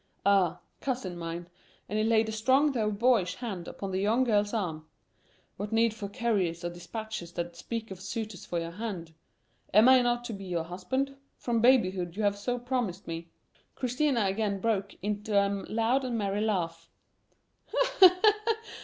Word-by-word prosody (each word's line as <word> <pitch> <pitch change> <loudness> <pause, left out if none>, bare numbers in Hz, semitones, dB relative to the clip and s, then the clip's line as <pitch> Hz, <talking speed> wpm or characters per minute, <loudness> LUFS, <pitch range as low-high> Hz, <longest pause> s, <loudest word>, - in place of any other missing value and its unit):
"Ah, 190 -4 +3 0.2
cousin 245 -9 -3
mine," 170 0 -5 0.4
and 215 - -1
he - - +2
laid 220 0 +3
a - - -3
strong 260 +7 +3
though 220 -5 0
boyish 210 -4 +2
hand 195 -8 -5
upon 195 -1 -5
the 185 - -1
young 225 +6 +3
girl's 210 -4 +2
arm. 165 -8 -3 0.7
"What 205 +2 -4
need 225 0 +3
for 205 -3 -6
couriers 195 -7 -1
or 175 - -2
dispatches 175 0 -6
that 170 0 -4
speak 225 +4 -5
of 190 -1 -8
suitors 215 -1 -5
for 175 - -3
your 165 0 -4
hand? 180 -5 -5 0.6
Am 215 +2 +8
not 245 -2 +5
I - - -17
to 240 -2 -5
be 195 -1 -7
your 175 -3 -1
husband? 260 +11 -2 0.2
From 235 -2 0
babyhood 190 -8 +3
you 215 - -1
have 205 -1 +2
so 245 +5 -2
promised 245 -7 -2
me." 165 0 -5 0.5
Christina 255 -2 +1
again 200 0 0
broke 205 -2 -1
into 210 0 -1
a 200 - +5 0.3
loud 230 +5 +2
and 245 -3 -2
merry 200 -1 -1
laugh. 165 -6 -1
210 Hz, 165 wpm, -29 LUFS, 180-230 Hz, 0.7 s, Am